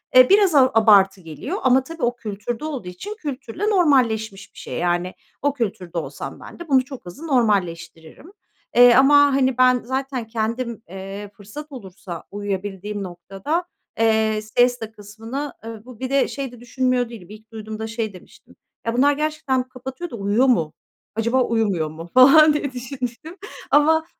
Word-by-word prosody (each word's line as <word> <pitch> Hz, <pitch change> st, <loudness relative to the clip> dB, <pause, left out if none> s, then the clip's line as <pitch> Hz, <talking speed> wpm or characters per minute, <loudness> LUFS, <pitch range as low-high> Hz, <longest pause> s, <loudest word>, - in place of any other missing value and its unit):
eee, 255 Hz, 0 st, +8 dB
biraz 395 Hz, -4 st, +5 dB
a 260 Hz, -2 st, +6 dB
abartı 200 Hz, -4 st, +5 dB
geliyor. 170 Hz, -, -6 dB
Ama 260 Hz, 0 st, +4 dB
tabii 330 Hz, +4 st, -8 dB
o 240 Hz, +1 st, +1 dB
kültürde 225 Hz, +4 st, -5 dB
olduğu 275 Hz, -11 st, -5 dB
için 385 Hz, -, -7 dB
kültürle 295 Hz, -, -4 dB
normalleşmiş 235 Hz, -, +1 dB
bir -, -, -22 dB
şey. -, -, -6 dB
Yani, 175 Hz, +1 st, -1 dB, 0.3 s
o 285 Hz, 0 st, +1 dB
kültürde 195 Hz, -9 st, -4 dB
olsam 165 Hz, -, -6 dB
ben -, -, -12 dB
de 345 Hz, -, -8 dB
bunu 260 Hz, -2 st, +3 dB
çok 270 Hz, -6 st, -10 dB
hızlı 280 Hz, -, -9 dB
normalleştiririm. 185 Hz, -, -1 dB, 0.4 s
Eee, 245 Hz, 0 st, +8 dB
ama, 270 Hz, +2 st, +6 dB, 0.2 s
hani, 260 Hz, -2 st, +1 dB
ben 255 Hz, -1 st, +4 dB
zaten 260 Hz, -1 st, -3 dB
kendim, 230 Hz, +1 st, -3 dB
eee, 195 Hz, +2 st, -8 dB
fırsat 255 Hz, +10 st, -10 dB
olursa 190 Hz, -, -9 dB
uyuyabildiğim 205 Hz, 0 st, -4 dB
noktada, 195 Hz, -, -4 dB, 0.3 s
eee, 220 Hz, -1 st, +2 dB
siesta 235 Hz, +1 st, +1 dB
kısmını, 225 Hz, +7 st, -7 dB
ııı, 225 Hz, 0 st, -8 dB
bu 250 Hz, -3 st, -13 dB
bir 260 Hz, -, -4 dB
de 275 Hz, 0 st, +2 dB
şey 275 Hz, -3 st, -5 dB
de 245 Hz, -, -13 dB
düşünmüyor 250 Hz, 0 st, 0 dB
değilim. 205 Hz, -7 st, -11 dB
İlk 215 Hz, +1 st, -14 dB
duyduğumda 220 Hz, 0 st, -6 dB
şey 225 Hz, -2 st, -4 dB
demiştim: 185 Hz, -, -17 dB, 0.3 s
"Ya 230 Hz, -, -1 dB
bunlar 285 Hz, +2 st, +4 dB
gerçekten 300 Hz, -3 st, -1 dB
kapatıyor 265 Hz, +6 st, -7 dB
da -, -, -7 dB
uyuyor 205 Hz, +4 st, +1 dB
mu? 165 Hz, -12 st, +2 dB, 0.4 s
Acaba 235 Hz, +4 st, +1 dB
uyumuyor 205 Hz, -10 st, 0 dB
mu?" 165 Hz, +2 st, -10 dB
falan 295 Hz, +4 st, +8 dB
diye 295 Hz, -2 st, -2 dB
düşünmüştüm 255 Hz, +6 st, -6 dB, 0.3 s
ama 320 Hz, +2 st, +4 dB
235 Hz, 160 wpm, -22 LUFS, 205-270 Hz, 0.4 s, eee